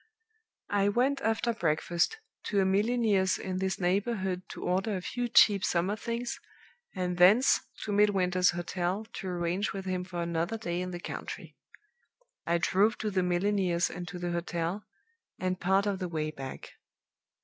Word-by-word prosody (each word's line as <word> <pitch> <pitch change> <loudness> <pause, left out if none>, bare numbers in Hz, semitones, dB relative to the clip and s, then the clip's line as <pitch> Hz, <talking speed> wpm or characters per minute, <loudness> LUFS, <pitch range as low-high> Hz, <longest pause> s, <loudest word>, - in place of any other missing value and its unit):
"I 200 0 +3
went 265 +6 +1
after 225 +1 +1
breakfast 170 - 0 0.3
to 205 - +1
a 190 - +3
milliner's 205 -1 +2
in 185 -1 -4
this 190 0 -1
neighborhood 190 0 0
to - - -7
order 195 +3 0
a - - -5
few 245 +4 -2
cheap 205 -4 +6
summer 180 +4 +1
things, 235 +2 -4 0.6
and 180 -1 -2
thence 210 +9 +6 0.2
to 210 - -3
Midwinter's 185 -3 +3
hotel 175 +3 -2
to 190 - -6
arrange 180 +2 -1
with 195 -1 -5
him 185 -1 -2
for 175 -2 -4
another 170 +5 -1
day 175 -5 -3
in 180 - -3
the 175 -1 -5
country. - - -7 0.9
I 170 +1 +3
drove 200 +5 +2
to 215 -1 -2
the 190 -1 +1
milliner's 180 -1 +1
and 175 0 -6
to 180 - -6
the 175 0 -3
hotel, 170 +3 -2 0.5
and 185 0 -2
part 190 +3 +2
of 200 -2 -1
the 180 -2 -3
way 155 -2 -2
back. 135 -3 -8
185 Hz, 160 wpm, -29 LUFS, 175-205 Hz, 0.9 s, cheap